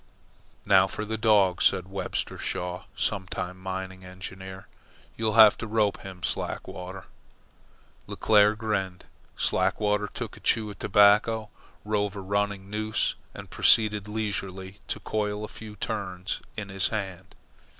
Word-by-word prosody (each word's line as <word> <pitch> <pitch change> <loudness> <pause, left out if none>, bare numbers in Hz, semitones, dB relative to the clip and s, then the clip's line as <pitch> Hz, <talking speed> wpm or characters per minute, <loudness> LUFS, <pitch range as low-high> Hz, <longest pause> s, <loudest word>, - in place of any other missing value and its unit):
"Now 95 -1 +6
for 105 +3 -4
the 110 +1 -2
dog," 105 -5 +3
said 90 - +3
Webster 95 0 -3
Shaw, 90 +1 -3
sometime 95 -2 -2
mining 95 0 -5
engineer. 95 +1 -9 0.5
"You'll 110 -1 0
have 110 -2 +8
to 115 - -4
rope 105 -2 +1
him, 95 -2 -10
Slackwater." 95 +1 -4 1.0
Leclere 105 0 +4
grinned. 95 -5 -2 0.3
Slackwater 105 0 +1
took - - -6
a - - -13
chew 110 -2 +1
of 100 - -13
tobacco, 105 +2 +4 0.3
rove 105 -1 0
a 100 - -5
running 100 0 -1
noose, 110 +1 -1 0.2
and - - -10
proceeded 105 -2 +4
leisurely 100 -3 -4
to - - -3
coil 105 -1 -2
a - - -4
few 105 -1 -10
turns 95 -2 -4 0.2
in 100 -2 -5
his 95 -1 +1
hand. 95 -3 -5
100 Hz, 130 wpm, -27 LUFS, 95-105 Hz, 1.0 s, have